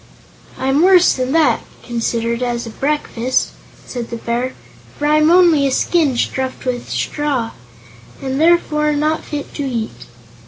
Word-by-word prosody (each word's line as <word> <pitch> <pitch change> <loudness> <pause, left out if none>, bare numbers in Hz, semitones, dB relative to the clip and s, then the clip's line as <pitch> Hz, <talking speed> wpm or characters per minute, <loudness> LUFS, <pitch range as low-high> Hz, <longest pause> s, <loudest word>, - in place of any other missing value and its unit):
"I'm 270 +3 +1
worse 365 0 +6
than 255 0 -2
that, 320 -2 +3 0.2
considered 235 0 -2
as 240 -1 -2
a 230 - -7
breakfast," 260 -2 -1 0.3
said 240 -2 -6
the - - -4
Bear, 235 +2 -3 0.4
"for 295 - -2
I'm 305 +1 +4
only 340 -5 +5
a - - -1
skin 295 -2 +1
stuffed 260 +2 -2
with 245 -1 -3
straw, 280 -6 -2 0.7
and 265 +2 -2
therefore 300 -3 +3
not 305 +2 0
fit 290 -1 -6
to 290 - -4
eat." 235 -5 -4
270 Hz, 145 wpm, -18 LUFS, 245-300 Hz, 0.7 s, worse